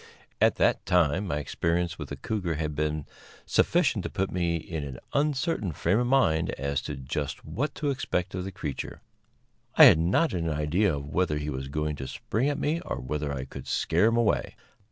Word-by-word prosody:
At - - +5
that - - +2
time 90 +2 +2
my 75 - -1
experience 85 +4 -1
with 75 - -6
the 70 - -4
cougar 90 +2 -2
had 75 0 -2
been 75 0 -1 0.4
sufficient - - +2
to - - -3
put 95 0 -2
me 85 -2 0
in 80 -1 -4
an 65 -3 -7
uncertain 140 - 0
frame 90 - +1
of 120 - +1
mind 95 -12 +3
as 70 +1 -1
to - - -3
just 70 +2 -4
what 145 +3 -3
to 145 -2 -1
expect 95 -8 -2
of 90 -1 -3
the 95 - -5
creature. 75 -6 -6 0.7
I - - +9
had - - +8
not 95 - +2
an 85 -2 -1
idea 75 +4 +1
whether 75 +3 -1
he 75 0 -3
was 65 0 -4
going 75 +1 -2
to 65 - -5
spring 125 - -1
at 145 - -1
me 160 +3 0
or - - -4
whether 75 +3 -3
I 65 -2 -4
could - - -9
scare 85 +6 +2
him 115 +1 +2
away. 115 -3 +1
85 Hz, 195 wpm, -27 LUFS, 75-100 Hz, 0.7 s, I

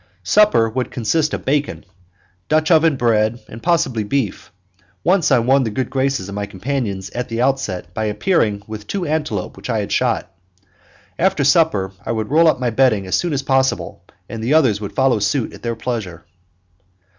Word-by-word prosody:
Supper 210 - +4
would 125 +3 -3
consist 150 +7 0
of - - -5
bacon, 145 -5 -1 0.6
Dutch 155 +2 +2
oven 160 -2 +4
bread, 115 -2 +1
and 115 - -10
possibly 135 -10 +1
beef; 105 -6 -2 0.5
once 180 -2 +2
I - - +6
won 130 +3 +3
the 115 - -1
good 120 +4 -3
graces 135 -7 -1
of 100 - -7
my 100 0 -3
companions 100 -2 -4
at 125 +1 -4
the 115 0 -3
outset 105 -10 -2
by 110 +3 -2
appearing 105 - 0
with 105 -1 -8
two 195 -3 -3
antelope 150 -11 -2
which - - -9
I - - 0
had - - -3
shot. - - 0 0.9
After 175 -5 +2
supper 135 - +3
I 115 - -2
would 110 +1 -3
roll 165 +2 +5
up 155 - +4
in - - -13
my 125 -2 0
bedding 110 -5 +2
as 95 - -5
soon 175 - 0
as 140 -2 -1
possible, 135 -1 0 0.2
and 115 -1 -6
the 130 +7 +2
others 120 -10 +3
would 100 - -6
follow 130 -4 +2
suit 105 +4 -1
at - - -12
their 115 -1 -3
pleasure. 110 -8 -5
125 Hz, 190 wpm, -19 LUFS, 105-145 Hz, 0.9 s, I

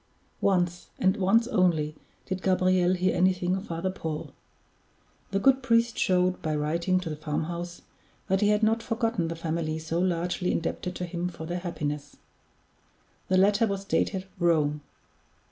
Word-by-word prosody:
Once, 180 -2 +1
and 190 0 +3
once 225 +5 +3
only, 170 - +2 0.3
did 185 0 -3
Gabriel 185 -1 +3
hear 185 +1 +1
anything 185 0 +2
of 190 +2 -5
Father 170 +3 -2
Paul. 160 -4 -5 1.0
The 195 - 0
good 270 +4 +4
priest 235 -2 +2
showed, 185 0 +2
by 155 -1 -1
writing 170 +5 +1
to 175 - -5
the - - -3
farmhouse, 170 +3 -4 0.4
that 190 +1 +1
he 205 - +4
had 210 +1 +2
not 225 +1 +3
forgotten 225 -6 -1
the 165 - -4
family 160 -1 -2
so 160 +1 -2
largely 180 0 0
indebted 180 +2 -2
to 180 - -3
him 175 0 -3
for 170 -2 -8
their 175 +2 -3
happiness. 150 -5 -4 1.1
The 185 - +3
letter 205 +4 +4
was 195 -1 -3
dated 190 -1 0
"Rome." 155 -4 +2
180 Hz, 155 wpm, -27 LUFS, 165-190 Hz, 1.1 s, good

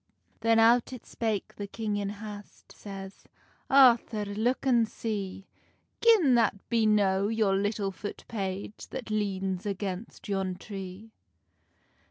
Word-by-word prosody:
Then 225 0 +3
out 230 +2 +5
it 255 - -9
spake 220 -4 -3
the 205 - -5
king 210 0 -3
in 200 -1 -2
hast, 205 0 -10
Says, 195 -1 -9 0.4
"Arthur 240 -5 +5
look 220 +7 -1
an 240 -4 +4
see 200 -4 -4 0.6
Gin 420 - +6
that 230 -4 +3
be 230 -2 +3
no 200 -2 +3
your 215 -3 +2
little 205 0 0
foot 205 +2 -7
page 200 -1 -5
That 245 -4 -6
leans 195 -3 -1
against 200 +2 -5
yon 195 -2 -1
tree." 195 +2 -8
210 Hz, 130 wpm, -29 LUFS, 195-225 Hz, 0.6 s, Gin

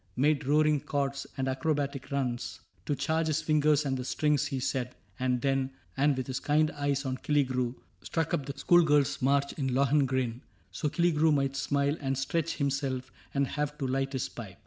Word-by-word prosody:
CAPTAIN 130 - +1
CRAIG 150 - +6
83 - - +2
Made 140 -1 -4
roaring 150 0 +4
chords 140 -1 -2
and 135 0 -1
acrobatic 140 0 -1
runs 120 -4 -2
— - - -36
To 145 - +1
charge 160 +3 0
his 155 0 0
fingers 150 -1 +3
and 135 -1 0
the 130 - -3
strings, 150 +2 +1
he 135 -2 -3
said, 125 -1 -2
— 95 0 -32
And 125 -1 +1
then, 135 -1 +1 0.3
with 135 -2 +2
his 130 +1 -3
kind 155 +1 +2
eyes 145 -1 -1
on 130 -1 -2
Killigrew, 130 -4 0 0.3
Struck 165 -1 -2
up 140 - -1
the 140 0 -6
schoolgirls* 150 -3 +4
march 140 +2 +2
in 135 - 0
Lohengrin^ 130 -3 +1 0.3
So 150 - -2
Killigrew 160 0 +3
might 135 -2 +1
smile 140 +1 0
and 135 -1 -1
stretch 160 +4 -1
himself 135 -3 -2 0.2
And 140 0 +3
have 150 +2 -3
to 140 - -2
light 135 +1 -1
his 130 - -1
pipe. 100 -7 -9
140 Hz, 195 wpm, -29 LUFS, 130-150 Hz, 0.3 s, CRAIG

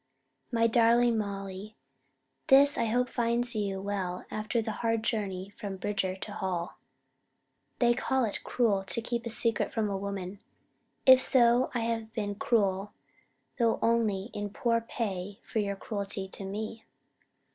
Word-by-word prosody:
MY 230 -1 +2
DARLING 235 +1 +4
MOLLY: 200 0 -5 0.7
This 280 0 +6
I 230 - 0
hope 245 +3 +1
finds 240 -1 0
you 200 -2 -1
well 190 -2 -3
after 215 +2 -1
the 220 0 -2
hard 225 -1 +1
journey 200 -4 -2
from 205 -2 -6
Bridger 190 -1 -1
to 200 +2 -8
Hall. 185 -4 -3 1.0
They 240 -1 +4
call 260 +1 +1
it 210 - -5
Cruel 210 -6 +1
to 230 - 0
keep 235 +1 -3
a - - -3
Secret 230 0 +1
from 215 -3 -1
a - - -1
Woman. 195 -1 -5 0.7
If 260 -1 +9
so, 245 -1 +5
I 240 - +1
have 225 -1 -2
been 205 -3 -2
Cruel, 200 -2 0 0.7
though 230 -1 +3
only 225 -3 +1
in 205 0 -3
Poor 230 +3 0
pay 200 -4 -4
for 220 - -2
your 200 -1 -1
Cruelty 200 -1 -4
to 195 - -7
me. 215 +3 -5
215 Hz, 150 wpm, -29 LUFS, 195-235 Hz, 1.0 s, If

